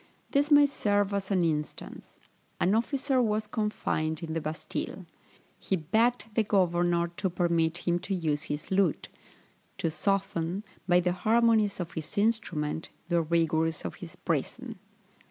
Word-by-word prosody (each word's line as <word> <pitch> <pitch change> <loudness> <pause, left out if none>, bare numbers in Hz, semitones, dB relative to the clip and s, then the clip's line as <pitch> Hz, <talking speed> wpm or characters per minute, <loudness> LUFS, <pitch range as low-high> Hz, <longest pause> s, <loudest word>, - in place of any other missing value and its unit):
This 285 +1 +2
may 290 -1 +7
serve 205 -7 +1
as 195 -1 -2
an 190 -3 +2
instance: 150 -2 -4 0.4
An 190 - +3
officer 260 +3 +1
was 215 -2 0
confined 185 -7 -2
in 160 -1 -4
the 165 - -1
Bastile; 155 +1 -5 0.5
he 190 - 0
begged 225 +9 +1
the 225 - +3
governor 175 -4 +2
to 195 -2 0
permit 170 -1 0
him 175 0 +2
the 195 - -3
use 155 -4 -1
of - - -9
his 150 +4 -5
lute, 190 -4 +1 0.7
to 165 - -1
soften, 190 +1 -1 0.2
by 180 -1 +5
the 180 0 +1
harmonies 220 0 +3
of 175 -2 -4
his 160 +3 -5
instrument, 175 -8 0 0.2
the 170 -1 +3
rigours 160 -1 +1
of 90 - -4
his - - -9
prison. - - -3
180 Hz, 150 wpm, -29 LUFS, 165-210 Hz, 0.7 s, may